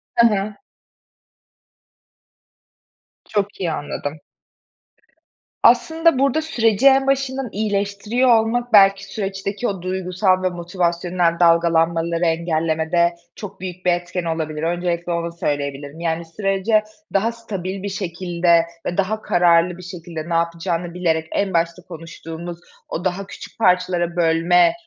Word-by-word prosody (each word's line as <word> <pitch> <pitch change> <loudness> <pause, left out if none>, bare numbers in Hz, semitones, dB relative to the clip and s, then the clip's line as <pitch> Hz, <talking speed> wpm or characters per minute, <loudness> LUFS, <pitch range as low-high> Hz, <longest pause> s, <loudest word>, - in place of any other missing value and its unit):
Hı 235 0 +6
hı. 210 -1 -1 2.7
Çok 205 -1 -2
iyi 170 -3 0
anladım. 145 0 -5 1.4
Aslında 325 -3 +4
burada 275 +3 +2
süreci 240 -5 +2
en 270 0 +5
başından 270 -2 0
iyileştiriyor 210 +4 0
olmak, 240 +1 -2
belki, 195 -1 +6
süreçteki 200 +2 -3
o 195 -3 -3
duygusal 185 +1 0
ve 185 - +2
motivasyonel 175 -1 -1
dalgalanmaları 170 0 +3
engellemede 165 +1 +1 0.2
çok 200 -2 -9
büyük 185 0 -7
bir 180 - +4
etken 175 0 -3
olabilir. 160 -2 -3
Öncelikle 175 0 -1
onu 170 0 -2
söyleyebilirim. 145 -1 -4
Yani, 165 0 -2
sürece 195 +4 +1 0.3
daha 215 +4 +2
stabil 195 -4 -6
bir 200 - -2
şekilde 175 -3 +1 0.2
ve 175 - -3
daha 215 +3 0
kararlı 175 0 +3
bir 180 - -11
şekilde 170 -2 -7
ne 170 - -1
yapacağını 170 +1 -1
bilerek, 160 -3 0
en 195 -2 -1
başta 170 +1 0
konuştuğumuz 165 +1 -8 0.3
o 175 - -4
daha 190 +2 -2
küçük 215 - -11
parçalara 180 -3 +2
bölme, 170 +1 +4
180 Hz, 120 wpm, -21 LUFS, 170-200 Hz, 2.7 s, Hı